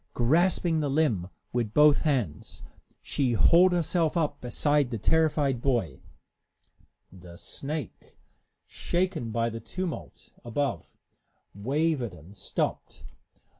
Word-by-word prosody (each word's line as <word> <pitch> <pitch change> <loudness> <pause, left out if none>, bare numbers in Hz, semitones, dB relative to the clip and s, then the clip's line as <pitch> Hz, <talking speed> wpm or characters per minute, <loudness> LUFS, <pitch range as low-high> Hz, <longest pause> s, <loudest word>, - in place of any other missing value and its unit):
Grasping 165 +5 +2
the 145 -2 -1
limb 135 - +1 0.2
with 115 -3 -2
both 150 -1 +6
hands, 120 - -2 0.4
she 130 -4 0
hauled 175 - +5
herself 170 -1 +1
up 155 -3 -1
beside 145 +2 +1
the 115 - -3
terrified 145 -1 +1
boy. 115 - -1 1.1
The 90 -2 -13
snake, 140 - -7 0.5
shaken 175 -8 -2
by 115 +1 -1
the 115 - -6
tumult 180 - -6
above, 135 +4 -3 0.6
wavered 130 - -1
and 85 +5 -15
stopped. - - -3
140 Hz, 105 wpm, -27 LUFS, 115-160 Hz, 1.1 s, both